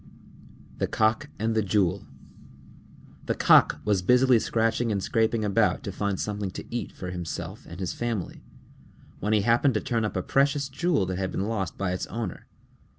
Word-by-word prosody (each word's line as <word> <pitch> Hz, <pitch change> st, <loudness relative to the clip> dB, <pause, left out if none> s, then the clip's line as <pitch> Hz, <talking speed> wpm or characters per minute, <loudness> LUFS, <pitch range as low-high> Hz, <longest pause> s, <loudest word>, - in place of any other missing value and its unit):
_ -, -, -21 dB
THE -, -, +1 dB
COCK 110 Hz, +7 st, +1 dB
AND 110 Hz, +1 st, 0 dB
THE 110 Hz, -, +2 dB
JEWEL 100 Hz, -3 st, 0 dB, 1.2 s
A -, -, 0 dB
Cock -, -, +5 dB
was 100 Hz, -3 st, +2 dB
busily 125 Hz, +4 st, +5 dB
scratching 115 Hz, +1 st, 0 dB
and 100 Hz, -2 st, -1 dB
scraping 110 Hz, -1 st, +1 dB
about 100 Hz, -2 st, +2 dB
to -, -, -4 dB
find 100 Hz, -2 st, -2 dB
something 105 Hz, -2 st, -3 dB
to -, -, -7 dB
eat 120 Hz, -, -3 dB
for 90 Hz, -1 st, -7 dB
himself 90 Hz, -2 st, -6 dB
and 85 Hz, -, -9 dB
his 95 Hz, -2 st, -2 dB
family, 115 Hz, -7 st, -4 dB, 0.8 s
when 105 Hz, -, -1 dB
he 105 Hz, -, +4 dB
happened 120 Hz, +4 st, +3 dB
to -, -, +2 dB
turn 115 Hz, 0 st, -1 dB
up 105 Hz, -, -2 dB
a 90 Hz, -, -1 dB
precious 140 Hz, 0 st, +1 dB
jewel 155 Hz, -, +1 dB
that 90 Hz, 0 st, -3 dB
had 95 Hz, -1 st, -2 dB
been 100 Hz, -, -2 dB
lost 95 Hz, -8 st, -3 dB
by 100 Hz, -2 st, -1 dB
its 90 Hz, -, -3 dB
owner. 110 Hz, -3 st, -5 dB
105 Hz, 185 wpm, -26 LUFS, 95-120 Hz, 1.2 s, Cock